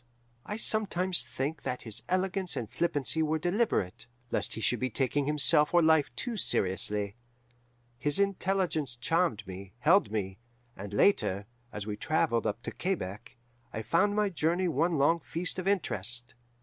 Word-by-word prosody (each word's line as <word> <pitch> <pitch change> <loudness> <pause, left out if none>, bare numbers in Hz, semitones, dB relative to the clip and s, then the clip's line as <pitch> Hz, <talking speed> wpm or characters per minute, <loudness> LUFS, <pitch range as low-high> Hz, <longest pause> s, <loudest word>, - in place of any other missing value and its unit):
I 210 - -3
sometimes 190 -5 +2
think 145 +3 -4
that 125 - -4
his 115 0 -5
elegance 185 0 0
and 115 - -3
flippancy 160 +2 -1
were 155 0 +1
deliberate, 175 - 0 0.2
lest - - -1
he - - -5
should 120 +1 +1
be 130 - -1
taking 135 +3 0
himself 150 +2 +3
or 175 - +6
life 160 -2 +4
too 240 -3 -4
seriously. 100 - +1 0.8
His 145 +6 +2
intelligence 190 -8 0
charmed 125 - 0
me, 95 0 -9
held 165 - +4
me, 100 -2 -3 0.4
and, 100 +1 -8
later, 100 - +2 0.3
as 105 -1 -5
we 105 -1 -4
travelled 150 -3 +1
up 110 +3 -3
to - - -4
Quebec, 120 - -4 0.3
I 110 - -5
found 190 - +2
my 210 -1 +2
journey 175 +1 0
one 165 +1 +1
long 165 +5 +3
feast 170 +3 -3
of 185 - -4
interest. 120 - -1
150 Hz, 155 wpm, -30 LUFS, 110-180 Hz, 0.8 s, or